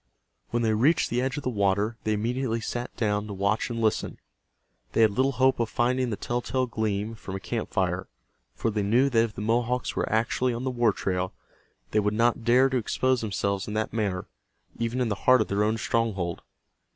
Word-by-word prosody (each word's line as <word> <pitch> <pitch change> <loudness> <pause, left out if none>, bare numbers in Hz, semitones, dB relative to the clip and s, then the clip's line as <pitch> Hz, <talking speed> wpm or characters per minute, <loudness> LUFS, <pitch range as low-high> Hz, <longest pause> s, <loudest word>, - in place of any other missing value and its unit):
When 120 0 0
they 110 -1 +2
reached 135 +10 +3
the 120 +1 +1
edge 135 +2 -1
of 145 - -4
the - - 0
water 100 +1 +1
they 110 - +2
immediately 115 +2 -1
sat 120 +2 -4
down 105 -1 0
to 105 - -5
watch 100 +4 0
and 115 -1 -3
listen. 110 -2 0 0.8
They - - +3
had 110 -2 +6
little 130 +6 +1
hope 130 +1 +3
of 115 -2 0
finding 125 +1 +1
the 110 - -1
telltale 120 +3 -1
gleam 110 -2 -2
from 100 -3 -7
a - - -3
camp 115 +3 -3
fire, 95 -2 -1 0.5
for 115 - -1
they 105 0 -1
knew 120 +7 +3
that 115 -2 +4
if 115 -2 -4
the - - -5
Mohawks 120 +3 0
were - - -1
actually 120 +3 +1
on 120 - -4
the 130 - -1
war 120 -3 +3
trail 95 -1 -2 0.6
they 110 - +3
would 105 0 0
not 115 +1 +2
dare 125 +3 +5
to 130 - 0
expose 130 +2 +1
themselves 100 -2 -1
in 105 - -4
that 110 0 -1
manner, 100 -5 -1 0.5
even 115 +2 -1
in 120 - +1
the - - +1 0.2
heart 130 0 +8
of 110 - 0
their 100 +1 +1
own 110 +1 +1
stronghold. 100 -6 -1
115 Hz, 210 wpm, -27 LUFS, 105-120 Hz, 0.8 s, heart